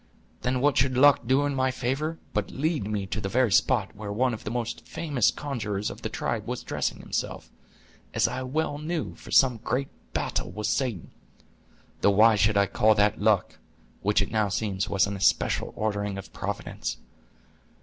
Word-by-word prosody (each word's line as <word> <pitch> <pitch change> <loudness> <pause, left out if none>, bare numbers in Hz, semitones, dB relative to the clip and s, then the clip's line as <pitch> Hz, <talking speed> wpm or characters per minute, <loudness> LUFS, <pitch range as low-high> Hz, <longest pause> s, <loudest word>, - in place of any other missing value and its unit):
Then 125 0 0
what 145 0 +3
should 130 0 +2
luck 140 -3 +5
do 135 +3 +3
in 145 - -1
my 130 -1 +1
favor 135 +6 -2 0.2
but 105 -1 -1
lead 150 - -1
me 105 -2 -2
to 105 +3 -4
the 100 - -3
very 125 +1 +2
spot - - +2
where 105 0 -6
one 125 +4 +1
of 110 - -7
the - - -2
most 120 0 -3
famous 145 -9 +1
conjurers 105 -8 -3
of - - -10
the - - -3
tribe - - -3
was - - -4
dressing - - -2
himself, - - -4 0.6
as - - +2
I 130 - -3
well 145 +3 -2
knew, 160 +1 -3
for - - -14
some 130 -3 +5
great 125 +5 -2 0.2
battle - - -2
with 105 0 -5
Satan—though 120 - -1 1.0
why 110 +3 +6
should 105 0 +3
I 100 - +5
call 110 +3 +3
that 105 0 +2
luck, 105 -3 +2 0.4
which 105 0 +3
it - - -8
now 110 -2 +1
seems 100 0 -2
was 100 -1 +3
an 100 0 -4
especial 95 - +1
ordering 100 -2 -2
of 95 - -9
Providence. - - -4
110 Hz, 180 wpm, -27 LUFS, 105-130 Hz, 1.0 s, why